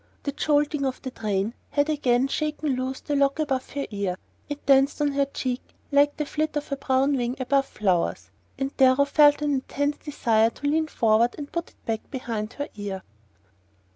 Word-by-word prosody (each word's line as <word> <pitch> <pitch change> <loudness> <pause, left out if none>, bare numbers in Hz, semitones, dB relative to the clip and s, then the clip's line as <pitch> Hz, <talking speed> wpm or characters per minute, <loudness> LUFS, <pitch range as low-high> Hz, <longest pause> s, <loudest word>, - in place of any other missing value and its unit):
The 285 - -1
jolting 295 0 +1
of 265 -1 -1
the 260 - -4
train 210 -2 -1 0.2
had 285 0 +1
again 265 -4 +2
shaken 300 -1 -1
loose 260 +1 -3
the 290 - -2
lock 275 0 +2
above 275 -4 -1
her 280 0 -2
ear. 200 -3 -2 0.3
It 290 0 -6
danced 275 +1 +4
on 290 -1 +2
her 280 0 +2
cheek 255 -2 -3 0.3
like 285 +1 +4
the 300 - -1
flit 305 +1 -2
of 290 -1 -5
a - - +1
brown 270 +1 +1
wing 245 -1 -1
over 275 +2 +3
flowers, 190 -9 -1 0.3
and 270 0 -3
Darrow 265 +1 +5
felt 295 0 +5
an 295 -1 +1
intense 285 +2 -1
desire 225 -7 +2
to 260 - -10
lean 310 +2 +2
forward 230 -3 +2
and 290 -1 -7
put 340 -1 -3
it - - -30
back 225 -1 -3
behind 230 -5 -4
her 285 - -4
ear. 200 -2 -5
275 Hz, 190 wpm, -25 LUFS, 240-290 Hz, 0.3 s, Darrow